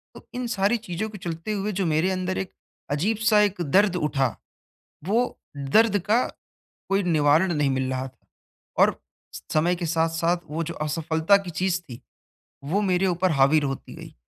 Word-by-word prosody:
तो - - -14
इन 250 -1 -3
सारी 200 +4 +2
चीज़ों 180 +5 -3
के 210 - -9
चलते 170 +2 -5
हुए 205 +1 -2
जो 190 0 -1
मेरे 160 +3 +1
अंदर 185 0 -2
एक 190 - -4 0.4
अजीब-सा 210 +7 +2
एक 200 -3 0
दर्द 185 +5 +3
उठा, 140 -7 0 0.7
वो 230 +7 0 0.2
दर्द 205 +10 +3
का 235 +3 +4 0.6
कोई 195 +1 +2
निवारण 160 +1 +3
नहीं 150 -3 +1
मिल 130 0 -1
रहा 130 0 -2
था 130 - -21 0.5
और - - +4 0.6
समय 170 +3 +2
के 175 0 -4
साथ-साथ 165 +1 +1
वो 160 +3 -2
जो 170 +1 -5
असफलता 160 +4 +2
की 195 -2 -7
चीज़ 180 +3 0
थी, 125 -9 -11 0.6
वो 175 +9 0
मेरे 190 -1 +2
ऊपर 180 0 +1
हावि 140 +2 +4
र - - -3
होती 135 -1 -5
गयी - - -11
175 Hz, 170 wpm, -24 LUFS, 155-195 Hz, 0.7 s, का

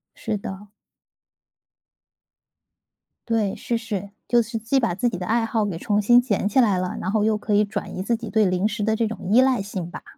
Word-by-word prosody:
是 - - -3
的。 195 +1 -8 2.6
对， 220 -4 0
是 235 - -2
是， 210 -4 -5 0.2
就 240 -1 +4
是 230 0 -4
既 225 +5 +1
把 180 - +1
自 200 +7 0
己 220 - -2
的 180 - -5
爱 225 +3 +1
好 220 -1 0
给 190 -5 -3
重 205 +4 0
新 240 +4 +6
捡 205 -4 -1
起 260 - +2
来 210 -6 +4
了， 180 0 -3
然 185 - -3
后 210 0 +1
又 215 -1 +2
可 210 0 -3
以 205 +1 +5
转 205 -2 -5
移 185 - -2
自 235 +3 0
己 230 -1 -7
对 220 -2 +3
零 185 +2 +1
食 215 -1 -3
的 220 +1 +1
这 230 -2 +1
种 225 - -5
依 235 - +6
赖 260 -5 +3
性 190 -4 -5
吧。 - - -9
215 Hz, 235 characters per minute, -23 LUFS, 195-230 Hz, 2.6 s, 新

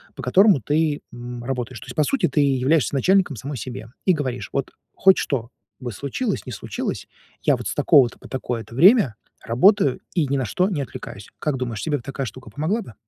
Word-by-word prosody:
по - - -8
которому 195 - +5
ты, 150 +4 0
м, 120 0 -7
работаешь. 125 -2 -4
То - - -12
есть, 125 - -8
по 155 - +3
сути, 205 - +1
ты 155 - -1
являешься 140 0 +2
начальником 180 +1 +3
самой 140 +5 -6
себе 115 0 -7 0.2
и 185 - +6
говоришь: 130 - -3
"Вот 135 - -2 0.2
хоть 190 -1 +5
что 120 -4 -2 0.3
бы 125 -2 -5
случилось, 140 - -3
не - - -5
случилось, 105 - -4 0.4
я - - +4
вот - - -5
с - - -3
такого-то 130 -4 +4
по - - -13
такое-то 120 -3 -4
время 175 - +6 0.3
работаю 140 - +3 0.2
и 165 -4 +2
ни 140 +1 0
на 130 - -1
что 180 - +1
не 150 -6 -1
отвлекаюсь". 105 -5 -8
Как 150 -3 -1
думаешь, 120 -4 -4
тебе 150 -2 0
бы 125 - -11
такая 135 +1 -4
штука 130 +3 -9
помогла 175 +10 -1
бы? 120 - -11
135 Hz, 205 wpm, -22 LUFS, 120-160 Hz, 0.4 s, и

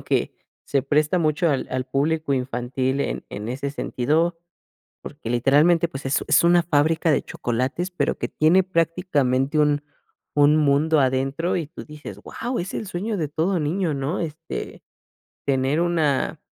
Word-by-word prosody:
Como - - -14
que, - - 0 0.3
se 140 - +1
presta 150 +5 +2
mucho 160 +1 +1
al 135 - -1
al 130 0 -2
público 150 +2 0
infantil 130 +1 -1
en - - -3
en 105 +2 -6
ese 140 +3 -3
sentido, 155 +5 0 0.6
porque 145 -6 -8
literalmente, 150 +8 +4
pues, 135 -2 -8
es 135 - +1
es 155 +2 +4
una 175 0 +5
fábrica 160 +1 +2
de 145 - +2
chocolates, 130 +10 -2
pero 180 - -1
que - - -2
tiene 165 +5 +4
prácticamente 160 -6 0
un 150 -1 +2 0.5
un 145 +1 +5
mundo 150 +1 +3
adentro, 135 +6 0
y 165 - -2
tú 160 - -10
dices: 150 -10 -10
"Guau, 240 - -5
es 180 +2 -4
el 220 - -4
sueño 200 +4 -3
de 160 -5 -2
todo 165 +6 0
niño", 160 +2 0
¿no? 140 +6 -2
Este 165 0 -6 0.6
tener 135 +3 +1
una 160 -6 0
150 Hz, 160 wpm, -23 LUFS, 135-170 Hz, 0.6 s, una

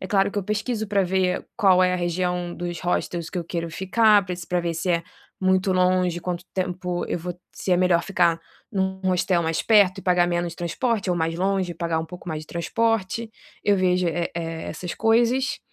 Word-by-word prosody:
É 185 - -5
claro 195 0 +2
que 205 - -3
eu 200 - -1
pesquiso 215 +2 -2
para 200 -1 +2
ver 185 0 0
qual 190 -4 +5
é 180 0 +3
a - - +1
região 175 0 -1
dos 175 -1 -5
hostels 175 -1 -2
que 185 - -3
eu 170 - -3
quero 170 0 -4
ficar, 205 +3 +4
para 180 -1 -4
se 170 -2 -8
para 180 0 0
ver 170 -1 -2
se 170 +3 -1
é 170 -1 +2 0.4
muito 190 0 +2
longe, 180 -1 +2
quanto 175 0 -4
tempo 180 -1 -2
eu - - -2
vou 175 +1 -6 0.2
se 185 - -2
é - - +5
melhor 180 -1 +3
ficar 170 -3 +2 0.3
em 195 - -2
um 190 0 -1
hostel 180 -1 +2
mais 160 0 0
perto 200 -4 +4
e - - -7
pagar 180 -1 +3
menos 175 -1 -1
transporte 200 +3 -1
ou 175 - +1
mais 165 0 0
longe 190 -1 0
e - - -12
pagar 165 0 -1
um 160 - -2
pouco 180 +1 -10
mais 155 -1 -3
de - - -13
transporte, 225 +4 -1 0.3
eu 205 -1 +3
vejo, 180 -1 +2
eh, 170 +1 -2
e - - -1 0.3
essas 180 -1 -5
coisas. 240 +4 +2
180 Hz, 220 wpm, -24 LUFS, 175-195 Hz, 0.4 s, qual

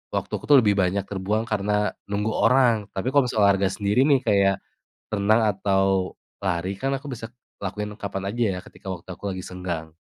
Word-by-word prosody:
waktu - - -2
aku - - -11
tuh 145 - +9
lebih 105 -2 +4
banyak 95 +1 +1
terbuang 105 +3 -1
karena 105 -1 0 0.2
nunggu 105 +2 -1
orang. 125 0 +4 0.2
Tapi 110 +7 -1
kalau 140 -3 +4
misalnya 110 - 0
olahraga 95 0 +1
sendiri 105 +4 +1
nih, 140 -3 +5
kayak 100 -3 +4 0.6
renang 105 +2 +3
atau 95 -1 +1 0.3
lari, 95 0 -1
kan 135 +1 -1
aku 135 - -14
bisa 115 -2 -6 0.3
lakuin 105 +2 -4
kapan 95 -1 -4
aja 120 0 0
ya - - -4
ketika - - -14
waktu 90 +1 -11
aku 95 - -11
lagi 95 -1 -5
senggang. 85 -4 -5
100 Hz, 185 wpm, -24 LUFS, 95-110 Hz, 0.6 s, tuh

